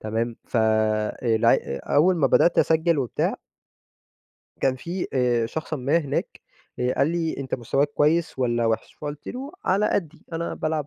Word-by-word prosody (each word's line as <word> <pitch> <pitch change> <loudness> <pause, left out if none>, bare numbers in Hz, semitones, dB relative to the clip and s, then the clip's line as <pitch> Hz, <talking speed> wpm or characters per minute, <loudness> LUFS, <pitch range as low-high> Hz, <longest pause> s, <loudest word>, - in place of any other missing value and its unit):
تمام؟ 115 +2 -2
ف - - -4 0.7
الع 115 -3 +4 0.4
أول 180 +4 +5
ما 140 -4 +3
بدأت 170 +5 +4
أسجل 160 -1 +3
وبتاع 150 - 0 1.3
كان 130 -1 +2
في 175 +7 -4
آآ 120 -3 +2
شخصًا 155 +4 -4
ما 140 +6 +2
هناك، 140 -4 -3 0.4
آآ، 125 0 0
قال 140 - +2
لي: 165 -2 -1
"أنتَ 130 -2 -3
مستواك 135 +4 0
كويس 155 0 +1
والّا 120 -2 +1
وحش؟" 110 -1 -2
فقُلت 145 -1 -7
له: 270 +5 -6
"على 200 +3 +2
قدّي، 165 -6 -3
أنا 165 +1 -3
بالعب 155 -2 -2
145 Hz, 155 wpm, -24 LUFS, 125-165 Hz, 1.3 s, أول